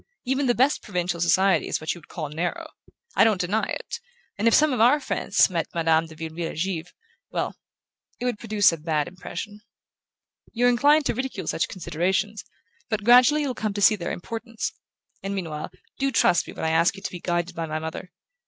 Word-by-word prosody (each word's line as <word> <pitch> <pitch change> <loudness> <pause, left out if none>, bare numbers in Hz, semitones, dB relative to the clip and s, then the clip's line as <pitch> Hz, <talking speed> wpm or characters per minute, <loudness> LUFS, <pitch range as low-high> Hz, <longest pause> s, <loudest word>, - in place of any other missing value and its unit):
Even 265 +2 0
the 240 - +3
best 265 +4 +2
provincial 180 -4 -2
society 190 +3 +3
is - - -1
what 155 - -2
you 175 - -11
would - - -20
call 155 -3 -5
narrow: 165 +4 -4 0.4
I - - +6
don't 215 -4 +3
deny 200 +5 0
it; - - -5 0.4
and 215 +2 0
if 230 - +5
some 305 -2 +4
of 245 - 0
our 255 +6 +6
friends 205 -7 +2
met 170 -4 -2
Madame 165 -1 +2
de 160 - -13
Vireville 165 +1 -5
at - - -11
Givre 180 0 -2 0.4
well, - - -2 0.6
it 245 - -3
would 245 -4 -1
produce 210 -4 +3
a 165 - -4
bad 155 -1 -1
impression. 195 +3 -7 0.9
You're 245 +1 +3
inclined 290 +5 +4
to - - +1
ridicule 260 +3 -4
such - - 0
considerations, 190 +4 -2 0.5
but 215 -2 -1
gradually 250 +6 +6
you'll 275 -3 -1
come 215 -3 -3
to 205 - -2
see 215 +2 +6
their 175 -4 -4
importance; 230 +4 -5 0.5
and 195 +1 -3
meanwhile, 160 -5 -4 0.3
do 275 0 +1
trust 175 -8 +3
me - - -8
when - - -4
I 160 - +1
ask 165 +4 +3
you 195 - -11
to - - -3
be 180 - -7
guided 175 0 -1
by 165 -1 -4
my 155 0 -3
mother. 160 +3 -6
195 Hz, 205 wpm, -25 LUFS, 170-235 Hz, 0.9 s, I